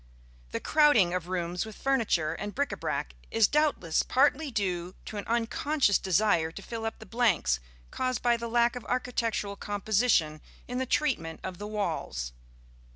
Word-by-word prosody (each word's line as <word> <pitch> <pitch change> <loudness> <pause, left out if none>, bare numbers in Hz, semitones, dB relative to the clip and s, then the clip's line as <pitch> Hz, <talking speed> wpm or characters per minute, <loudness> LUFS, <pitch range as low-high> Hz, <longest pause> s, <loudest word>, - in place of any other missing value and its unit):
The - - -3
crowding 290 - +4
of 180 -2 -2
rooms 175 -1 -2
with 220 -2 -9
furniture 220 -13 +1
and 205 +4 -6
bric 285 +1 0
à 200 - -5
brac 140 - -2 0.2
is 225 -2 +4
doubtless 295 - +2
partly 285 +3 +2
due 185 -6 -2
to 215 - -6
an 205 - -4
unconscious 235 +1 +2
desire 185 -4 +2
to 200 - -8
fill 225 +1 -5
up 225 - -5
the - - -11
blanks 205 - +2 0.3
caused 255 -2 -2
by 240 -1 +4
the 235 0 -4
lack 235 +1 +2
of 245 - -6
architectural 230 -5 -1
composition 205 -7 +1 0.3
in 245 +1 -3
the 260 - -1
treatment 230 - 0
of 185 -2 -6
the 205 - -5
walls. 130 - -3
215 Hz, 165 wpm, -29 LUFS, 175-245 Hz, 0.3 s, crowding